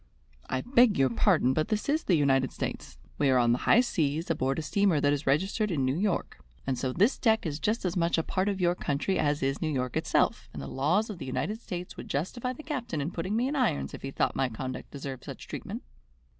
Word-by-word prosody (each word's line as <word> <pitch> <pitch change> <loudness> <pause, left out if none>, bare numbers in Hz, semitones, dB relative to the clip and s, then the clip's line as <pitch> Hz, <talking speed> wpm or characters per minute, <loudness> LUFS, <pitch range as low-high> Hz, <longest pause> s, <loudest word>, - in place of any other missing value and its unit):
"I 130 - 0
beg 245 -4 +4
your 135 -2 +3
pardon, 125 +2 +3
but 155 +2 0
this 215 -1 -1
is 305 +3 +1
the 180 - +4
United 135 -3 +2
States. 65 - -5 0.2
We 145 - +3
are 130 - +4
on 120 -1 +4
the 120 - +3
high 240 - +7
seas, 160 - -1
aboard 135 -3 0
a 160 - -2
steamer 195 0 +2
that 145 0 +3
is 145 0 -3
registered 195 +9 +1
in 145 -7 0
New 130 +1 +1
York, 195 +1 -1 0.3
and 135 - 0
so 125 +1 -2
this 205 - +2
deck 220 -4 +2
is 150 -2 -3
just 215 +3 0
as 180 0 -1
much 170 -1 +2
a 165 - +1
part 190 +4 0
of 195 -1 -2
your 175 -1 +3
country 155 +3 -1
as 145 -1 +1
is 135 0 -1
New 160 - 0
York 125 -3 -2
itself, - - +1
and 75 - -6
the 70 - -6
laws 175 - +1
of 190 - -8
the 135 - -5
United 210 - -2
States 180 -4 -6
would - - -8
justify 235 - -2
the 255 +5 -9
captain 250 - -3
in 145 +4 -2
putting 185 +5 -3
me 240 +3 +1
in 290 - -2
irons 240 - 0
if - - -8
he 135 - -4
thought - - 0
my 135 -1 +1
conduct 130 +3 -6
deserved 135 -2 -7
such - - -9
treatment." - - -6
160 Hz, 245 wpm, -29 LUFS, 135-205 Hz, 0.3 s, high